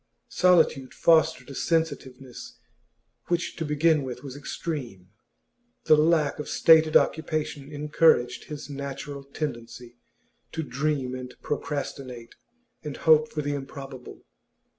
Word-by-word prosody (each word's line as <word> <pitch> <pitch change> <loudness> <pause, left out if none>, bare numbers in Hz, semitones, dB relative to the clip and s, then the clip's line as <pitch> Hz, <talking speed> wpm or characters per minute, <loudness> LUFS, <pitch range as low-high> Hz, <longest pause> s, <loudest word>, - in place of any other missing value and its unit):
Solitude 165 -7 +3
fostered 160 -5 +3
a - - -7
sensitiveness 135 -6 -3 0.7
which 175 0 -1
to 165 - -2
begin 155 +1 +2
with 130 -1 -7
was 135 -2 -8
extreme; 130 - -6 0.7
the 155 - +6
lack 155 -1 +2
of 150 - -5
stated 160 -1 +6
occupation 155 -2 -2
encouraged 150 -3 +2
his 150 -1 -8
natural 140 0 -6
tendency 120 -4 -7 0.5
to 160 - -2
dream 140 -1 -2
and 125 -1 -7
procrastinate 135 -5 -5 0.5
and 150 -2 -6
hope 155 -1 +4
for 150 - -3
the 145 0 -2
improbable. 135 -2 -8
145 Hz, 115 wpm, -26 LUFS, 130-155 Hz, 0.7 s, the